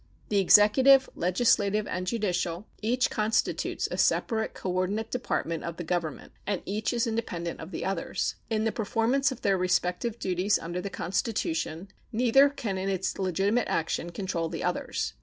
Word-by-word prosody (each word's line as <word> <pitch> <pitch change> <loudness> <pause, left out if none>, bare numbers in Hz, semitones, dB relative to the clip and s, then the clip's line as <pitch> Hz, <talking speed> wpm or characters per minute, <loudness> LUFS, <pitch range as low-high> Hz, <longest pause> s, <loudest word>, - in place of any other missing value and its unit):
The 205 - +2
executive, 260 +8 +6
legislative, 205 +2 +2
and 185 0 -4
judicial 180 -4 -1 0.2
each 245 +4 +1
constitutes 220 +1 0
a - - -3
separate 220 -2 +1
coordinate 185 +4 -2
department 170 -9 -2
of 170 0 -5
the 175 - -4
Government, 170 -2 -3 0.2
and 200 -3 -1
each 210 +2 -1
is 240 -2 +1
independent 200 -7 -3
of 160 - -8
the - - -5
others. 190 -3 -2 0.2
In 220 -1 0
the 225 - +1
performance 230 +6 +1
of 255 - -7
their 195 -2 +2
respective 180 +5 0
duties 190 -1 +1
under 175 +2 -5
the 200 - -4
Constitution 175 -2 -2 0.2
neither 250 +4 +5
can 230 -9 -4
in 190 +1 -2
its 190 0 -2
legitimate 195 +5 +1
action 165 +1 -1
control 170 -2 -3
the - - -5
others. - - -2
200 Hz, 160 wpm, -28 LUFS, 180-225 Hz, 0.2 s, executive